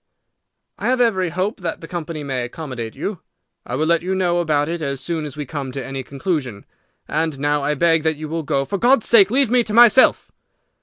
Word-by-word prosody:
"I - - -2
have 255 0 +1
every 190 -7 +2
hope 185 +7 -2
that 170 -2 -4
the 165 - -10
company 165 -3 -5
may 130 -3 -3
accommodate 120 -3 -6
you. 200 -4 -4 0.5
I 125 - -3
will 155 +4 0
let 170 0 +2
you 185 +2 -2
know 175 -2 +1
about 150 -3 +1
it 170 0 -4
as 140 -3 -3
soon 155 +3 -3
as 150 0 -8
we 150 - -4
come 140 -1 -5
to 135 -1 -5
any 135 0 -5
conclusion. 135 - -4 0.4
And 155 -1 -1
now 145 +1 0
I 150 +2 0
beg 165 +2 +3
that 160 -1 0
you 155 +1 -6
will 165 +2 -3
go. 140 -2 -1
For 195 +8 -3
God's 245 0 +3
sake 210 -5 +6
leave 260 0 +2
me 245 -1 +4
to 215 -2 -4
myself!" 240 +2 +6
160 Hz, 220 wpm, -20 LUFS, 140-185 Hz, 0.5 s, sake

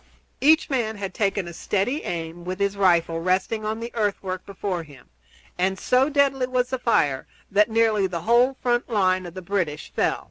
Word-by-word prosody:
Each 315 +3 +5
man 235 -5 -1
had 195 -2 -5
taken 195 -2 -1
a 170 - -7
steady 210 - -1
aim 170 0 -5
with 185 +1 -4
his 200 0 0
rifle 170 -4 +2
resting 185 +5 0
on 215 +1 -2
the 235 +1 -6
earthwork 200 -4 -2
before 195 -2 -3
him, 140 - -15 0.5
and 190 +1 +1
so 255 +7 +2
deadly 275 -3 +2
was 250 0 0
the 260 - -1
fire 145 - +1 0.2
that 210 +3 +4
nearly 220 -3 +2
the 170 -3 -4
whole 245 +6 +3
front 240 -1 +1
line 185 -4 +1
of 175 - -11
the 185 - -7
British 175 -6 -3
fell. - - +1
200 Hz, 185 wpm, -24 LUFS, 180-240 Hz, 0.5 s, Each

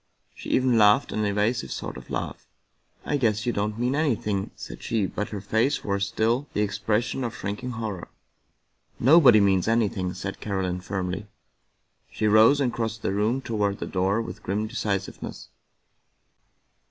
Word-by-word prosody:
She - - -9
even 125 -3 +3
laughed 105 +5 +5
an 110 0 -1
evasive 105 - 0
sort - - -5
of 65 -1 -11
laugh. - - -5 0.3
" - - -34
I 145 - 0
guess 110 -3 +1
you 120 - 0
don't 105 +1 -2
mean 125 +2 0
anything," 110 -10 0
said - - -9
she, 110 -4 0
but 105 +2 -4
her 105 -2 -5
face 110 +8 +1
wore 100 -1 -1
still 115 +6 0
the 105 - 0
expression 105 +5 -1
of 120 - -3
shrinking 115 +6 -4
horror. 110 -6 -5 0.5
" - - -42
Nobody 140 -9 +8
means 95 -2 +3
anything," 100 -5 0
said 95 +1 -5
Caroline 95 -3 -2
firmly. 95 +1 -4 0.8
She 110 - -3
rose 110 +6 +6
and 125 -4 +1
crossed 110 -1 -3
the 95 - 0
room 110 +6 +1
toward 105 -5 -1
the - - -4
door 95 +4 0
with - - -8
grim 105 +3 -2
de 110 - -9
cisiveness. 100 -2 -4
105 Hz, 165 wpm, -25 LUFS, 100-115 Hz, 0.8 s, Nobody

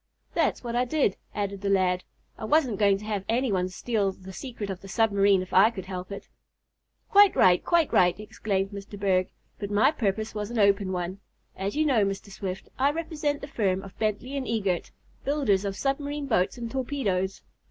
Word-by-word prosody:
"That's - - +1
what 235 -1 -3
I 245 - +3
did," 255 -5 +1 0.2
added 200 -1 -3
the 200 - -1
lad. 185 -2 +2 0.3
"I - - -10
wasn't 255 -5 +2
going 200 -2 +4
to 210 - -10
have 210 -3 -2
any 245 +1 +1
one 185 -1 0
steal 205 0 -1
the 190 0 -12
secret 225 -4 -5
of 190 - -7
the 195 - -11
submarine 200 -2 +3
if 185 - -12
I 195 +4 +7
could 195 -6 -7
help 185 0 -6
it." 200 - -7 0.8
"Quite 405 -1 +7
right! 180 -1 +5
Quite 340 -3 +2
right!" 180 +1 +4
exclaimed 200 -2 -2
Mr. 200 0 -8
Berg. 185 -2 +2 0.3
"But 200 - -4
my 205 +7 +4
purpose 220 -6 -2
was 210 -1 -4
an 240 - -4
open 200 -2 +3
one. 180 +1 -3 0.4
As 195 +4 -3
you 310 +1 +2
know, 250 -8 +3
Mr. 195 +1 -3
Swift, 190 -1 -5
I 275 +2 +4
represent 300 -2 -2
the 280 - -6
firm 195 -8 0
of 195 - -11
Bentley 215 +3 -1
& 280 0 -2
Eagert, 200 -6 -1 0.3
builders 260 -9 +1
of 195 -1 -2
submarine 285 +1 -2
boats 220 -5 +1
and 235 -1 -5
torpedoes. 225 -9 -1
205 Hz, 195 wpm, -27 LUFS, 190-250 Hz, 0.8 s, I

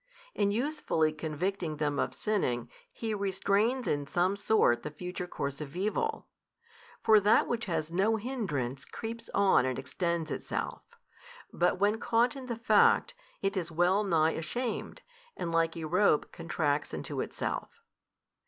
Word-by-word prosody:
In 205 -1 +1
usefully 215 - +1
convicting 160 +1 -3
them 145 -1 0
of - - -1
sinning, 130 - -1 0.2
He 225 -1 -3
restrains 200 +5 +1
in 145 -1 0
some 180 +5 +1
sort 200 - +3
the - - -5
future 180 +4 -6
course 140 -3 -4
of 150 0 -7
evil. 215 - -1 0.8
For 220 -1 +7
that 205 +2 +4
which 240 -1 -2
has 165 -4 -2
no 195 +6 +2
hindrance, 195 - -3
creeps 230 0 -7
on 200 -7 +5
and 130 -1 -1
extends 170 -3 -2
itself; - - -3 0.7
but - - +2
when 210 +2 +2
caught 235 +4 +2
in 265 -2 -8
the 235 - -2
fact, 230 +2 +4 0.3
it 195 +1 0
is 175 -3 -2
well 180 +5 +3
nigh 165 -5 +3
ashamed, 230 +11 -4 0.3
and 170 - -3
like 165 0 +1
a 165 - -5
rope 175 0 +2
contracts 155 -3 -1
into - - -3
itself. - - -3
185 Hz, 145 wpm, -30 LUFS, 155-215 Hz, 0.8 s, For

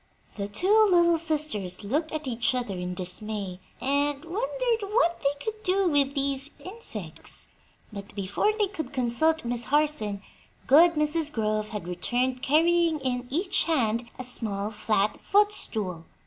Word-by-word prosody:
The 200 -1 -3
two 405 - +4
little 340 -2 +4
sisters 295 - -2
looked 300 +10 -1
at 310 -1 -4
each 240 -1 0
other 240 -5 -2
in 180 0 -4
dismay 190 +1 -3 0.2
and 285 +2 0
wondered 470 +5 -1
what 415 -6 +2
they 280 0 -1
could 435 -1 -4
do 385 -1 +1
with 280 -2 +2
these 275 +1 -1
insects, 445 +5 -9 0.5
but 200 -1 -9
before 200 - 0
they 425 - +3
could 315 -9 -6
consult 265 +5 +1
Miss 240 -1 0
Harson 265 -8 0 0.4
good 335 +5 +7
Mrs. 300 0 0
Grove 215 -3 -1
had 210 -5 -6
returned 250 +8 -1
carrying 330 +2 +3
in 250 -1 -2
each 355 +7 +1
hand 235 -7 0
a 255 - -5
small 215 -4 -2
flat 215 -1 0
footstool. 220 - 0
275 Hz, 145 wpm, -26 LUFS, 215-330 Hz, 0.5 s, good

